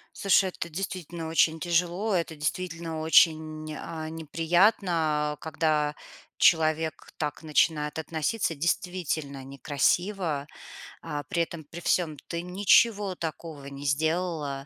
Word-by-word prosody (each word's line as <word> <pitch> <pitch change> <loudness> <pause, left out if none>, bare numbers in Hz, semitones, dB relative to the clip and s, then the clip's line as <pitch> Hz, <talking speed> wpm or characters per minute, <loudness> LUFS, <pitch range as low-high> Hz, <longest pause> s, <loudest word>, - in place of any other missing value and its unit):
Слушай, 195 -1 +3
это, 170 - -6
действительно, 170 -1 -5
очень 160 0 +3
тяжело, 175 +5 0
это, 165 -2 -1
действительно, 165 +1 -3
очень, 155 -1 +3
а, 160 0 -6
неприятно, 165 -2 +1
когда 155 -1 0 0.4
человек 160 -1 +2
так 150 0 -3
начинает 150 -1 +1
относиться 165 +4 -1
действительно 160 -3 -2
некрасиво, 145 - 0 0.6
а, 145 -1 -3
при 170 +4 0
этом 165 -1 -7
при 155 +4 -9
всём 170 -3 0
ты 170 - -3
ничего 200 +2 +3
такого 160 -3 -6
не 140 0 -8
сделала, 155 -1 -1
160 Hz, 110 wpm, -27 LUFS, 150-175 Hz, 0.6 s, Слушай